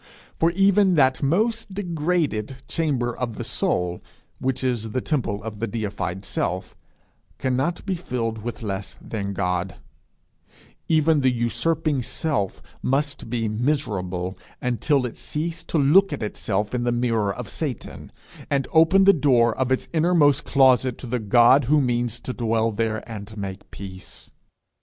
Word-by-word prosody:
For 165 Hz, -, +4 dB
even 195 Hz, 0 st, +4 dB
that 130 Hz, -3 st, +3 dB
most 210 Hz, +7 st, 0 dB
degraded 155 Hz, -, -1 dB
chamber 130 Hz, -7 st, -1 dB
of 120 Hz, -3 st, -3 dB
the -, -, -5 dB
soul 90 Hz, 0 st, -1 dB, 0.4 s
which 130 Hz, 0 st, -1 dB
is 115 Hz, -4 st, -1 dB
the 130 Hz, -, +1 dB
temple 120 Hz, -8 st, -2 dB
of 105 Hz, -2 st, -6 dB
the 115 Hz, -, -1 dB
deified 100 Hz, -4 st, -4 dB
Self, -, -, -2 dB, 0.6 s
cannot 135 Hz, +7 st, -1 dB
be 195 Hz, -, 0 dB
filled 115 Hz, -10 st, -3 dB
with 115 Hz, +1 st, -6 dB
less 100 Hz, -2 st, -4 dB
than 100 Hz, -3 st, -4 dB
God; 90 Hz, -1 st, -1 dB, 1.1 s
even 160 Hz, -1 st, +3 dB
the 130 Hz, -, +4 dB
usurping 145 Hz, +5 st, 0 dB
Self 120 Hz, -5 st, -2 dB, 0.2 s
must 140 Hz, -2 st, -1 dB
be 115 Hz, -1 st, -1 dB
miserable 105 Hz, -7 st, -1 dB, 0.2 s
until 125 Hz, +2 st, +1 dB
it 120 Hz, -, -6 dB
cease 165 Hz, +2 st, -3 dB
to -, -, -1 dB
look 160 Hz, +7 st, +5 dB
at 140 Hz, -6 st, -3 dB
itself 105 Hz, 0 st, -2 dB
in 125 Hz, -1 st, 0 dB
the 120 Hz, -, +1 dB
mirror 115 Hz, -4 st, +1 dB
of -, -, -6 dB
Satan, -, -, -5 dB, 0.4 s
and 140 Hz, -2 st, 0 dB
open 165 Hz, +4 st, +6 dB
the 200 Hz, +1 st, +7 dB
door 125 Hz, -, +3 dB
of 130 Hz, -1 st, -1 dB
its 130 Hz, -, +1 dB
innermost 155 Hz, -4 st, +3 dB
closet 130 Hz, -2 st, +4 dB
to -, -, -8 dB
the 125 Hz, +1 st, -2 dB
God 120 Hz, +5 st, +5 dB
who 150 Hz, +4 st, +4 dB
means 120 Hz, -3 st, 0 dB
to 125 Hz, -, -4 dB
dwell 115 Hz, -1 st, 0 dB
there, 110 Hz, +1 st, -2 dB
and 110 Hz, -1 st, -8 dB
make 100 Hz, -1 st, -6 dB
peace. 95 Hz, -1 st, -9 dB
125 Hz, 150 wpm, -24 LUFS, 110-150 Hz, 1.1 s, the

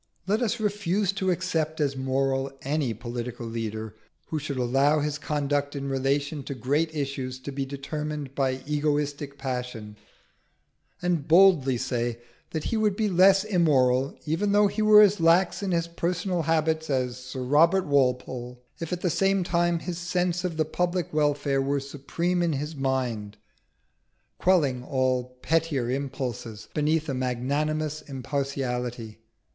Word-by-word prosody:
Let 210 Hz, +5 st, +1 dB
us 235 Hz, 0 st, 0 dB
refuse 205 Hz, -2 st, 0 dB
to 195 Hz, -2 st, -1 dB
accept 160 Hz, -3 st, -1 dB
as 140 Hz, -2 st, +1 dB
moral 135 Hz, 0 st, 0 dB
any 140 Hz, -2 st, 0 dB
political 120 Hz, +1 st, -5 dB
leader 110 Hz, -1 st, -4 dB, 0.4 s
who 155 Hz, -, -1 dB
should 145 Hz, -2 st, -4 dB
allow 135 Hz, +5 st, +3 dB
his 150 Hz, 0 st, -2 dB
conduct 145 Hz, -1 st, -1 dB
in 140 Hz, 0 st, -3 dB
relation 140 Hz, +2 st, 0 dB
to 140 Hz, -, -5 dB
great 145 Hz, +6 st, 0 dB
issues 135 Hz, -3 st, -3 dB
to 140 Hz, -, -6 dB
be 135 Hz, 0 st, -3 dB
determined 145 Hz, 0 st, -5 dB
by 130 Hz, -1 st, -1 dB
egoistic 145 Hz, -1 st, -1 dB
passion, 125 Hz, -5 st, -5 dB, 1.1 s
and 175 Hz, -5 st, 0 dB
boldly 160 Hz, -7 st, +5 dB
say 120 Hz, -1 st, -2 dB, 0.3 s
that 160 Hz, -, -3 dB
he 225 Hz, -, -1 dB
would 210 Hz, -2 st, +2 dB
be 215 Hz, 0 st, 0 dB
less 190 Hz, +1 st, +5 dB
immoral 140 Hz, -9 st, +2 dB
even 185 Hz, +7 st, 0 dB
though 205 Hz, 0 st, +5 dB
he 205 Hz, +2 st, 0 dB
were 215 Hz, 0 st, +8 dB
as 205 Hz, -1 st, +3 dB
lax 170 Hz, +4 st, +3 dB
in 200 Hz, -, -2 dB
his 170 Hz, -1 st, +1 dB
personal 175 Hz, +1 st, -1 dB
habits 160 Hz, 0 st, 0 dB
as 125 Hz, -2 st, -1 dB
Sir 130 Hz, 0 st, -5 dB
Robert 165 Hz, +8 st, +4 dB
Walpole, 125 Hz, -3 st, 0 dB, 0.2 s
if 165 Hz, 0 st, -5 dB
at 180 Hz, 0 st, -2 dB
the 180 Hz, -, +1 dB
same 195 Hz, +2 st, +2 dB
time 175 Hz, 0 st, +1 dB
his 175 Hz, 0 st, -5 dB
sense 180 Hz, 0 st, -1 dB
of 175 Hz, -3 st, -3 dB
the 155 Hz, -, +2 dB
public 175 Hz, +2 st, -1 dB
welfare 145 Hz, -2 st, +1 dB
were 140 Hz, +1 st, 0 dB
supreme 150 Hz, +6 st, -2 dB
in 170 Hz, -2 st, +1 dB
his 150 Hz, +3 st, -4 dB
mind, 125 Hz, -6 st, -2 dB, 1.0 s
quelling 145 Hz, -9 st, +2 dB
all 130 Hz, -1 st, -1 dB
pettier 150 Hz, -7 st, +1 dB
impulses 130 Hz, -5 st, -4 dB
beneath 155 Hz, +1 st, +1 dB
a 140 Hz, -, -1 dB
magnanimous 145 Hz, +5 st, -1 dB
impartiality. 125 Hz, -5 st, -3 dB
145 Hz, 150 wpm, -26 LUFS, 130-170 Hz, 1.1 s, were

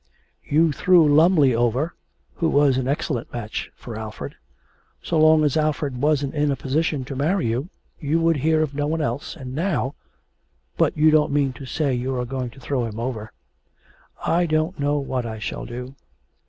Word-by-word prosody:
'You 160 Hz, +2 st, +3 dB
threw 170 Hz, +1 st, +4 dB
Lumly 150 Hz, -2 st, +5 dB
over, 120 Hz, +7 st, 0 dB, 0.4 s
who 165 Hz, -, +1 dB
was 145 Hz, -3 st, +4 dB
an 130 Hz, -, -2 dB
excellent 135 Hz, -3 st, -2 dB
match, 110 Hz, -2 st, -5 dB
for 115 Hz, -, -9 dB
Alfred. 110 Hz, -10 st, -7 dB, 0.7 s
So 165 Hz, -, 0 dB
long 155 Hz, 0 st, +6 dB
as 145 Hz, -3 st, +1 dB
Alfred 150 Hz, -4 st, -1 dB
wasn't 145 Hz, -2 st, +1 dB
in 150 Hz, -1 st, +1 dB
a 140 Hz, -, +1 dB
position 140 Hz, +1 st, -1 dB
to 135 Hz, -, -6 dB
marry 160 Hz, +6 st, +1 dB
you, 120 Hz, +8 st, -1 dB, 0.3 s
you 155 Hz, +1 st, 0 dB
would 165 Hz, -1 st, +2 dB
hear 155 Hz, +3 st, +2 dB
of 145 Hz, -2 st, -4 dB
no 145 Hz, +1 st, -1 dB
one 160 Hz, +1 st, -1 dB
else, 140 Hz, 0 st, -3 dB
and 130 Hz, -5 st, -8 dB
now 155 Hz, -4 st, -1 dB, 0.8 s
but -, -, +1 dB
you 155 Hz, +1 st, +5 dB
don't 155 Hz, -2 st, +3 dB
mean 140 Hz, -2 st, +1 dB
to 130 Hz, +2 st, -10 dB
say 140 Hz, -1 st, 0 dB
you 125 Hz, +2 st, -2 dB
are 125 Hz, 0 st, -2 dB
going 130 Hz, 0 st, -4 dB
to 130 Hz, -, -16 dB
throw 130 Hz, -1 st, -1 dB
him 110 Hz, -1 st, -6 dB
over.' 115 Hz, -3 st, -4 dB, 0.9 s
'I 175 Hz, +1 st, +2 dB
don't 155 Hz, +2 st, 0 dB
know 145 Hz, +1 st, +1 dB
what 130 Hz, -3 st, -2 dB
I 110 Hz, -1 st, -5 dB
shall 110 Hz, -, -5 dB
do.' 125 Hz, +2 st, -7 dB
145 Hz, 185 wpm, -23 LUFS, 125-155 Hz, 0.9 s, long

